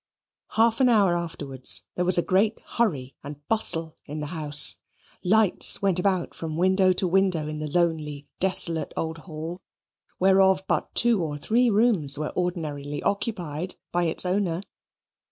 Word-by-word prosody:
Half 225 +1 +2
an 255 - +4
hour 200 -6 +3
afterwards 135 - -2
there 180 - -2
was 180 0 +5
a 175 - +2
great 205 +4 +1
hurry 145 - -2
and 145 +1 -11
bustle 165 -8 +2
in 150 +1 -6
the 150 - -4
house. 150 -3 +2 0.5
Lights 210 +1 +3
went 195 -3 0
about 185 -2 -1
from 160 -1 -6
window 185 +1 +3
to 185 +1 -2
window 180 -4 +1
in 155 0 -6
the 155 0 -5
lonely 150 -3 -2
desolate 175 -3 +3
old 160 0 -4
Hall, 165 +2 -8 0.6
whereof 190 0 +3
but - - -2
two 235 -5 +3
or 150 -3 -4
three 235 +11 +1
rooms 200 - +3
were 150 0 -5
ordinarily 150 -5 -4
occupied 185 -5 -3 0.2
by 175 0 0
its 165 +2 +3
owner. 180 -1 -1
175 Hz, 155 wpm, -24 LUFS, 155-195 Hz, 0.6 s, was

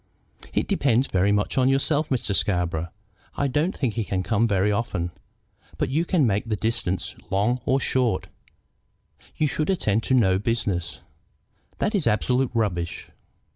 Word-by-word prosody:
"It - - 0
depends 135 - +2
very 95 -1 +1
much 105 +5 +1
on 130 0 +4
yourself, 145 +3 +1
Mr. 120 -6 -1
Scarborough. 90 -4 0 0.5
I 140 - 0
don't 150 +7 0
think 130 -6 0
he 115 - -1
can 95 -2 -2
come 110 +3 +2
very 100 -1 +2
often, 95 -5 -2 0.7
but - - -1
you 155 +6 +1
can 170 -6 +2
make 105 -1 +1
the 110 - 0
distances 95 -4 -2
long 105 +6 +1
or 135 +1 +3
short. 125 -7 +1 1.1
You 155 - +2
should 155 +2 -1
attend 115 - +1
to 130 - +2
no 95 -6 +3
business." 100 -6 -2 0.8
"That 210 - 0
is 195 -8 +1
absolute 125 +4 +2
rubbish." 90 -7 -2
115 Hz, 155 wpm, -24 LUFS, 95-135 Hz, 1.1 s, on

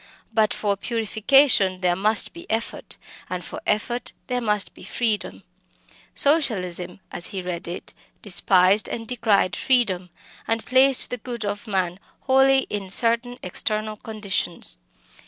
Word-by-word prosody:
But 215 -1 +2
for 205 -2 0
purification 220 -2 +2
there 180 -1 +2
must 210 +3 +1
be 340 +1 -12
effort, 225 +1 -4 0.3
and 180 -1 -4
for - - -7
effort 240 +3 -1
there 250 -1 -2
must 210 -3 -1
be - - -15
freedom. 225 -4 -2 0.7
Socialism, 190 - +2
as 175 - -4
he 195 -3 -5
read 175 -2 -5
it, 175 - -7 0.3
despised 190 0 +3
and 225 -1 -5
decried 220 -6 +1
freedom, 195 -9 +1 0.4
and 225 0 -1
placed 260 +1 +5
the 250 - -2
good 235 -1 -6
of 205 +2 -4
man 185 -3 -1 0.2
wholly 270 0 +4
in 200 -2 -4
certain 235 +4 +1
external 215 +3 -2
conditions. 200 - -1
215 Hz, 135 wpm, -23 LUFS, 185-240 Hz, 0.7 s, placed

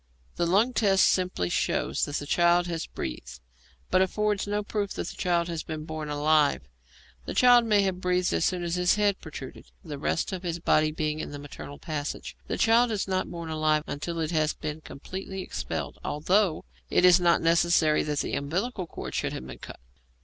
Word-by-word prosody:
The 170 - 0
lung 210 +8 +3
test 195 -4 +4
simply 180 - +1
shows - - 0
that 145 - -5
the 145 - -2
child 175 +3 +3
has 165 -2 -4
breathed, 65 +1 -6 0.5
but 185 - +4
affords 210 +2 0
no 205 0 -1
proof 205 -1 -3
that - - -4
the - - -9
child 170 -2 0
has 165 -2 -3
been 155 -1 -6
born 155 -1 -5
alive. 150 0 +2 0.6
The - - -5
child 245 -1 +6
may 210 -3 +3
have 185 -1 -2
breathed 180 0 +1
as - - +1
soon 180 -2 0
as 175 +1 -1
its 180 0 +3
head 205 -2 +1
protruded, 140 -5 -9 0.2
the 145 -3 -7
rest 160 - -1
of 185 -2 -4
the 170 -2 -3
body 155 -2 +3
being 155 0 -2
in - - -4
the 145 - -7
maternal 145 0 -9
passages. 150 -3 -5
The - - -2
child 235 +2 +4
is 210 -3 -2
not 185 -1 -1
born 170 -2 -6
alive 155 -1 +1
until 165 +4 -4
it 160 0 -1
has 155 -2 +1
been 155 0 -5
completely 190 +7 -7
expelled, - - -5
although 180 - +1 0.2
it 180 - +4
is 180 0 +7
not 170 -1 +4
necessary 165 -2 +3
that 150 -1 -1
the - - -4
umbilical 180 - -2
cord - - -7
should - - -1
have 65 - -6
been 65 -1 -9
cut. - - -10
170 Hz, 200 wpm, -27 LUFS, 155-190 Hz, 0.6 s, is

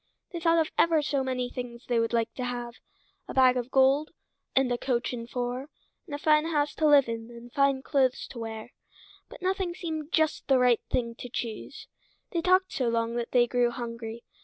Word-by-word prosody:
They 340 - -3
thought 330 0 +3
of 320 -1 +1
ever 325 -3 +4
so 280 -2 0
many 255 -1 -1
things 245 -1 -7
they 240 -2 +1
would 230 0 0
like 230 -1 0
to 255 - -5
have—a 245 -1 -8
bag 255 -1 +6
of 245 0 -2
gold, 270 +3 +3 0.5
and 265 -2 +3
a 245 - +1
coach 250 -1 -1
and 235 -1 -6
four, 250 +3 -3 0.4
and 290 - -5
a - - -3
fine 305 +1 +3
house 295 -3 0
to 310 - +1
live 285 -3 +6
in, 230 0 -5
and 235 0 -12
fine 275 -1 +2
clothes 265 -4 +1
to 240 - -8
wear, 225 +1 -6 0.6
but - - -12
nothing 375 -2 -1
seemed 315 -3 -5
just 315 -1 +1
the 270 - +5
right 250 -2 +4
thing 235 -2 -1
to 245 - -7
choose. 230 -2 -6 0.4
They 340 - 0
talked 370 +2 +3
so 250 -3 0
long 230 0 0
that 235 -1 -3
they 245 -1 +5
grew 245 0 +2
hungry. 230 -1 -6
255 Hz, 205 wpm, -28 LUFS, 235-300 Hz, 0.6 s, bag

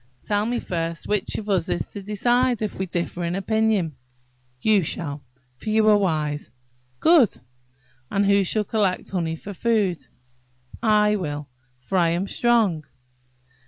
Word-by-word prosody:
"Tell 205 +1 0
me 240 0 -1
first 165 -1 -3
which 210 -1 -1
of 215 - -6
us 190 -5 0
is - - -1
to 200 - -8
decide, 240 +4 +1
if 210 - -2
we 190 - -4
differ 175 0 -3
in 170 +1 -1
opinion?" 205 -5 +1 0.6
"You 210 +4 +3
shall; 145 -2 -3 0.4
for 215 - -6
you 215 0 +3
are 210 - +6
wise." 155 - -1 0.5
"Good! 315 - +5 0.7
And 200 0 +1
who 200 0 +4
shall 210 +3 +1
collect 200 -3 -1
honey 165 -4 -1
for 200 +5 -8
food?" 205 -4 +1 0.8
"I 210 -1 +3
will; 145 -5 -5 0.3
for 185 +9 0
I 170 -1 +3
am 175 +4 -1
strong." 220 -11 +2
195 Hz, 150 wpm, -23 LUFS, 170-215 Hz, 0.8 s, are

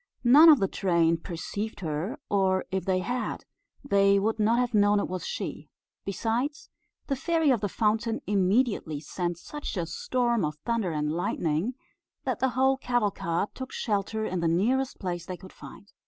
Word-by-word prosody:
None 290 +7 +8
of 305 - +9
the 195 - +2
train 170 -3 +2
perceived 200 +6 -5
her, 165 - -3
or 190 -2 +1
if 190 0 -2
they 185 -1 +1
had, 245 +5 -3 0.4
they 200 -6 +4
would 220 +3 0
not 220 +2 +3
have 245 -1 0
known 205 -1 +4
it - - -1
was 185 0 -4
she; 485 - -5 0.4
besides, 235 +9 -2 0.3
the 275 - -1
Fairy 320 +1 +2
of 235 -6 +1
the 205 - -1
Fountain 225 +3 0
immediately 200 - +1
sent 175 +3 -3
such 295 +4 -6
a 170 - -1
storm 235 +6 0
of 150 0 -1
thunder 230 -5 0
and 150 -1 -1
lightning 170 +5 -1 0.5
that 260 -4 -2
the 265 - +2
whole 265 +1 +4
cavalcade 210 -8 -1
took 260 0 -7
shelter 215 0 -1
in 185 -3 -2
the 170 - +1
nearest 245 +11 +1
place 175 -3 -4
they 185 -1 -5
could 185 0 -13
find. 200 - -13
205 Hz, 170 wpm, -27 LUFS, 180-245 Hz, 0.5 s, of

